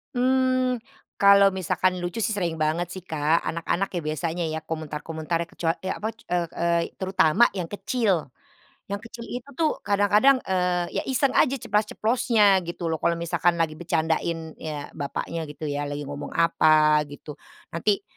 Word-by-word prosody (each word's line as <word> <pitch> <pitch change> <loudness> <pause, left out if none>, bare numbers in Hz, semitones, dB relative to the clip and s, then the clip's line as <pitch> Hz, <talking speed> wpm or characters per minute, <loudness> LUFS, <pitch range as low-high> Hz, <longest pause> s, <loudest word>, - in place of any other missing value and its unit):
Mmm, 255 0 +2 0.4
kalau 200 0 +7
misalkan 185 0 0
lucu 175 +5 -3
sih 220 -1 0
sering 175 -4 -1
banget 160 +3 +1
sih, 185 - -7
Kak. 160 -1 +1
Anak-anak 170 +3 -1
ya - - -2
biasanya 165 +2 -2
ya, 160 0 -2
komentar-komentar 160 +1 -4
kecua 165 -1 -1
e 190 - -4
apa, 220 +3 -3
k 225 - -23
eee 175 -1 0
eee, 170 0 +1 0.2
terutama 190 +3 +4
yang 180 - -2
kecil 200 - -1 0.6
yang 200 - -2
kecil 230 +1 -10
itu 245 +3 -6
tuh 315 0 0
kadang-kadang, 205 +7 +4
eee, 180 -2 0
ya - - -1
iseng 265 +1 +2
aja 275 -2 +3
ceplas-ceplosnya 215 -2 +2
gitu 170 -1 -3
loh, 160 - -2
kalau 170 - +1
misalkan 170 +1 +1
lagi 165 -2 0
bercandain, 165 -1 -1
ya, 150 -2 -6
bapaknya 160 +2 -4
gitu 150 +2 -10
ya, 145 -1 -2
lagi 145 0 -4
ngomong 145 0 -6
apa, 155 -2 +4
gitu. 145 +1 -10 0.3
Nanti, 200 +5 0
175 Hz, 160 wpm, -25 LUFS, 160-205 Hz, 0.6 s, kalau